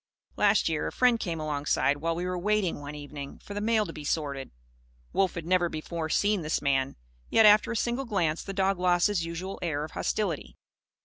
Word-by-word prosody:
Last 205 0 +3
year, 160 -2 -1
a - - -3
friend 250 -2 +3
came 170 -5 -3
alongside, 145 -1 +1
while 165 +3 -1
we 175 +2 -3
were 180 0 -2
waiting, 205 -3 0
one 145 +1 -7
evening, 145 -1 -8
for 205 - -10
the 205 - -3
mail 220 0 +2
to 165 - -7
be 150 - -8
sorted. 145 -3 -2 0.6
Wolf 190 -2 +1
had 165 -2 -5
never 175 0 +2
before 160 +1 -4
seen 205 +3 +2
this 155 0 0
man. 135 -1 0 0.3
Yet, 225 - +5
after 210 +2 +6
a - - -2
single 240 +4 -1
glance, 170 -8 0
the 195 - -6
dog 195 -1 +1
lost 175 -1 +3
his 205 -5 +1
usual 180 +4 -5
air 155 -4 -1
of 155 - -7
hostility. 160 - -2
175 Hz, 205 wpm, -28 LUFS, 150-205 Hz, 0.6 s, after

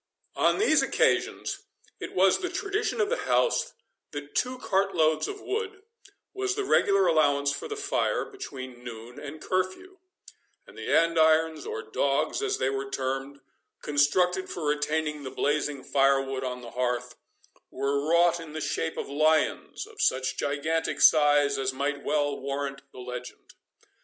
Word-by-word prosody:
On - - +3
these 430 - +4
occasions, - - +1 0.4
it - - -7
was 190 +1 +4
the 365 - -3
tradition 415 +5 -2
of 415 -2 +2
the - - +1
house, - - +2 0.4
that 145 0 -8
two 255 +1 0
cart 195 -4 0
loads 155 -1 +2
of 410 - -6
wood 415 -2 -4 0.5
was 390 -1 -1
the 415 -1 -2
regular 195 - +3
allowance 145 -4 +3
for 145 - -5
the 430 - -4
fire 400 -2 0
between 130 - -9
noon 120 0 -9
and 145 +2 -8
curfew, 185 - -3 0.7
and - - -16
the - - -5
andirons, 160 -1 +3
or 445 0 -4
dogs, - - 0
as 415 -2 0
they 130 - 0
were 135 0 -3
termed, 135 +1 -3 0.4
constructed 180 +6 +2
for 170 - -5
retaining 150 0 -1
the 135 - -6
blazing 145 0 -1
firewood 135 -1 +2
on 125 -1 -4
the 120 - -9
hearth, 125 -1 -2 0.5
were 140 +2 -1
wrought 170 +1 +4
in 160 -2 -9
the 155 - -4
shape 160 +1 -2
of - - -3
lions 155 +2 +1
of - - -9
such 130 0 +1
gigantic 155 +3 -1
size 145 -2 +5
as 135 0 -1
might 140 +1 -2
well 145 -1 0
warrant 140 0 -4
the - - -16
legend. 125 0 -8
150 Hz, 155 wpm, -27 LUFS, 135-185 Hz, 0.7 s, size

